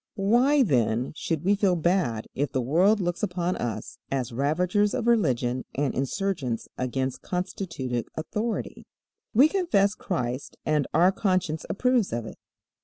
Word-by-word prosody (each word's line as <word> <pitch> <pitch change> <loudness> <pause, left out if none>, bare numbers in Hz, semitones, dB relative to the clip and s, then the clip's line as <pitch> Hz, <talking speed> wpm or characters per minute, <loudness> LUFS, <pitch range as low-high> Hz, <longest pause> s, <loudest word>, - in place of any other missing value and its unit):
Why, 245 +8 +4
then, 120 - +1
should 160 -1 -2
we 195 +3 +3
feel 200 -3 +2
bad 160 - +1
if 140 0 -1
the 130 - +1
world 180 - +3
looks 175 -2 -2
upon 180 -2 -1
us 110 -4 -5
as 130 -3 -2
ravagers 180 - +1
of 250 -3 -2
religion 130 - +2
and 140 -1 0
insurgents 135 - -2
against 130 +1 -2
constituted 165 - -3
authority? 210 +8 -4 0.5
We 265 +7 +7
confess 310 - +2
Christ 130 -10 -4
and 150 -2 +1
our 175 +4 +5
conscience 185 -6 -1
approves 250 -1 +1
of 115 -1 -2
it. - - -10
175 Hz, 140 wpm, -26 LUFS, 130-200 Hz, 0.5 s, We